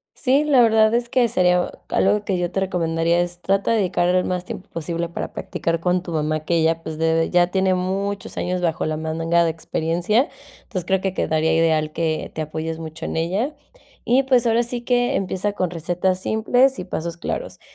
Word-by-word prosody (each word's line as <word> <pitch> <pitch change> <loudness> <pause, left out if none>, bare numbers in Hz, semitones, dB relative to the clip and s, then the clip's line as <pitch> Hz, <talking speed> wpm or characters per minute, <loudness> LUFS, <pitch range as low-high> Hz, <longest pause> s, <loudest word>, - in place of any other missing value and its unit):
Sí, 275 +2 +2
la 280 -5 +4
verdad 220 -1 +4
es 240 0 +1
que 250 -2 +3
sería 180 -2 +2 0.2
algo 205 +2 +2
que 190 -2 0
yo 175 0 -2
te 195 - -1
recomendaría 170 -2 +1
es, 175 0 -4
trata 195 +4 +1
de 230 - +3
dedicar 180 -3 +1
el 180 0 +2
más 180 -1 -2
tiempo 190 - -8
posible 170 +1 -3
para 170 - -5
practicar 165 0 -2
con 180 +1 0
tu 175 - -7
mamá 155 0 -1
que 170 +2 0
ella 165 0 +1
pues 160 -1 -6
debe 165 0 +1
ya 175 -1 +4
tiene 190 +1 +1
muchos 195 +2 -3
años 180 0 -1
bajo 165 -2 0
la 155 0 -2
manga 165 +2 +1
de - - +2
experiencia, 170 - 0 0.3
entonces 185 -6 -5
creo 190 +1 +2
que 190 -1 -1
quedaría 160 -2 +1
ideal 160 -2 +2
que 160 -2 -1
te 155 - -2
apoyes 160 +1 -4
mucho 160 0 -7
en - - -4
ella 195 - -1 0.5
y 255 +3 +3
pues 255 -2 +3
ahora 230 +1 +3
sí 240 0 -4
que 245 +2 +1
empieza 195 +1 -1
con 185 -3 -1
recetas 180 +2 -1
simples 245 +6 +2
y - - -4
pasos 170 -2 -4
claros, - - -5
180 Hz, 205 wpm, -22 LUFS, 165-210 Hz, 0.5 s, la